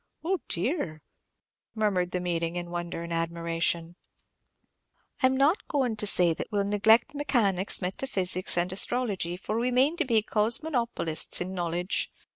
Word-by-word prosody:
oh 375 +1 0
dear!" 160 - -2 0.7
murmured 200 -5 +1
the 180 - -2
meeting, 170 -1 -2
in 175 -1 -5
wonder 175 -1 -4
and 170 0 -5
admiration. 165 0 -1 1.3
"I 260 - +6
'm 260 0 0
not 295 - +2
goin' 260 -6 0
to 210 - +1
say 175 -3 +4
that - - -5
we 210 - -1
'll - - +2
neglect 220 +6 +3
mechanics, 205 -11 +1
metaphysics, 185 -3 -1
and 175 +1 0
astrology; 195 -5 +1
for 215 +4 -3
we 245 +2 +1
mane 265 +7 +2
to 330 - +1
be 225 -4 +2
cosmonopolists 230 - 0
in 185 +2 -4
knowledge. 175 +1 -1
195 Hz, 150 wpm, -27 LUFS, 175-245 Hz, 1.3 s, I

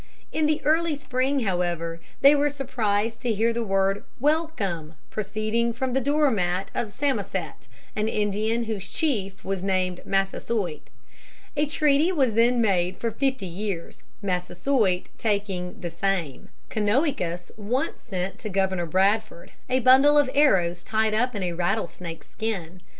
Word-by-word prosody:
In 310 -1 +1
the 305 0 0
early 320 +1 +3
spring, 270 -1 0
however, 175 -4 -1 0.2
they 280 +1 +8
were 290 0 +3
surprised 225 -5 -1
to 245 - 0
hear 225 +2 +2
the 235 0 -1
word 195 -1 +1 0.2
"Welcome" 235 - -1 0.2
proceeding 215 +3 -1
from 255 +2 -2
the 265 - +2
door 290 +2 +3
mat 180 -2 -1
of 235 -4 -2
Samoset, 275 +5 -2 0.3
an 215 0 0
Indian 215 +2 0
whose 210 -4 -4
chief 195 -11 -1
was 195 -1 -2
named 185 -2 0
Massasoit. 195 -3 -1 0.7
A 295 +1 +1
treaty 300 +3 +3
was 270 -10 +2
then 240 +2 +4
made 185 -5 +2
for 230 - -2
fifty 260 -2 -1
years, 185 -1 -5 0.2
Massasoit 185 +2 0
taking 200 -4 -1
"the 175 - -5
same." 170 -5 -2 0.2
Canonicus 205 - 0
once 225 +5 -2
sent 185 -2 -4
to 215 - -5
Governor 190 -3 0
Bradford 195 +2 +1 0.2
a 255 0 +2
bundle 270 +4 +7
of 285 -3 +4
arrows 180 - +3
tied 220 0 +1
up 245 +2 +1
in 200 - -2
a 175 -1 -1
rattlesnake's 175 -2 -3
skin. 185 -6 -4
215 Hz, 145 wpm, -25 LUFS, 185-255 Hz, 0.7 s, they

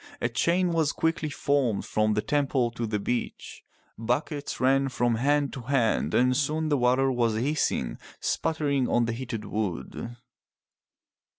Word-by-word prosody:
A 120 - 0
chain 170 +10 +1
was 160 -3 +1
quickly 165 -1 0
formed 140 -7 0
from 110 0 +1
the 105 - 0
temple 135 -2 +1
to 115 0 -4
the 105 -1 -1
beach. 120 +4 -4 0.4
Buckets 140 +5 -2
ran 135 +1 +3
from 120 -2 +1
hand 140 +4 +1
to 130 - -6
hand 115 - +1
and 125 +1 +3
soon 155 +2 0
the 145 - +2
water 130 +2 +3
was 120 -3 +1
hissing, 125 - -1 0.2
sputtering 145 -5 0
on 120 0 +2
the 115 - -2
heated 115 -3 -5
350 - - -9
FROM 105 -4 -1
THE 65 - -9
TOWER - - -8
WINDOW - - -9
wood. 120 - -13
130 Hz, 175 wpm, -27 LUFS, 115-145 Hz, 0.4 s, ran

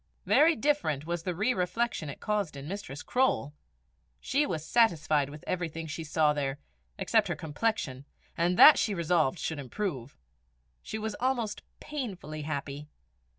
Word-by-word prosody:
Very 320 +2 +5
different 215 - 0
was 170 0 -2
the 180 0 -3
re 215 +8 +1
reflection 180 -2 -1
it - - -8
caused 205 -8 -1
in 140 +1 -8
Mistress 185 -6 -6
Croale: 250 - +1 0.7
she 290 +3 +1
was 160 - -3
satisfied 155 -9 +2
with 150 +1 -10
everything 165 -2 -3
she 160 +1 -5
saw 150 -1 +2
there, 140 -2 -2 0.4
except - - +2
her - - -2
complexion, 150 - -2 0.3
and 175 +2 +1
that 305 - +10
she 210 - 0
resolved 170 -2 +1
should 160 -1 -3
improve. 140 - -4 0.6
She 220 - -5
was 220 0 -3
almost 245 -4 -1 0.2
painfully 195 - -5
happy. 145 -1 -5
170 Hz, 150 wpm, -29 LUFS, 150-220 Hz, 0.7 s, that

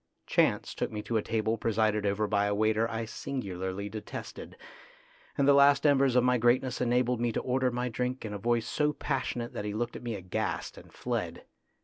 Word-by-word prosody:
Chance - - +1
took - - -3
me 105 -1 -5
to 115 - -1
a - - +1
table 110 +1 -1
presided 110 -2 +1
over 100 +2 +1
by 100 -1 +1
a 100 - 0
waiter 110 +2 +2
I 115 0 -3
singularly 100 -6 -4
detested, 105 +1 -8 0.8
and 140 - +3
the 140 - +7
last 140 +1 +5
embers 135 -3 +4
of 125 - +5
my 125 -1 +3
greatness 125 +2 +2
enabled 125 0 +1
me 120 -1 +1
to - - -1
order 130 0 +1
my 125 0 -2
drink 125 +1 -3
in 105 - -5
a 100 - -5
voice 115 +1 +1
so 150 +4 0
passionate 120 -4 -3
that - - -4
he 105 0 -4
looked 120 +2 -2
at - - -7
me 120 -2 -4
aghast 90 -2 -3
and - - -14
fled. - - -4
115 Hz, 205 wpm, -29 LUFS, 105-125 Hz, 0.8 s, the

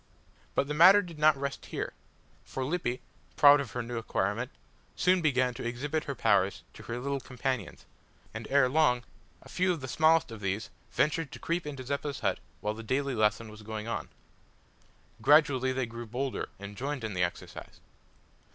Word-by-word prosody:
But 140 - +2
the 150 - -2
matter 185 +6 +8
did 170 -4 -10
not 155 -1 +5
rest 140 0 -4
here, - - -4 0.5
for 130 - -4
Lippy, 130 -5 -2 0.3
proud 145 0 +8
of 135 -7 -5
her 125 - -2
new 120 0 -4
acquirement 110 +2 -1 0.5
soon 180 0 +3
began 130 -5 +2
to - - -7
exhibit 140 +6 -2
her 140 - -4
powers 100 -4 +2
to - - -12
her 115 - -5
little 140 +2 -2
companions, 130 -5 -4 0.5
and 110 0 -6
ere 140 -1 +5
long 125 -3 +3 0.4
a - - -14
few 185 0 +1
of 170 - -2
the 130 - -6
smallest 160 +1 +3
of 110 - -8
these 100 +2 -2 0.2
ventured 155 -1 0
to - - -7
creep 170 -1 -2
into 140 -3 -6
Zeppa's 140 +1 -3
hut - - 0 0.2
while 105 - -1
the 110 - -8
daily 135 +4 -1
lesson 110 0 +1
was 110 0 -12
going 110 0 -6
on. 115 - -3 1.1
Gradually 140 -4 +4
they 130 -1 -1
grew 115 0 -8
bolder, 130 +4 -3
and 100 +1 -9
joined 135 +2 -4
in 110 -2 -3
the 90 - -1
exercise. 90 - -6
130 Hz, 180 wpm, -30 LUFS, 115-145 Hz, 1.1 s, matter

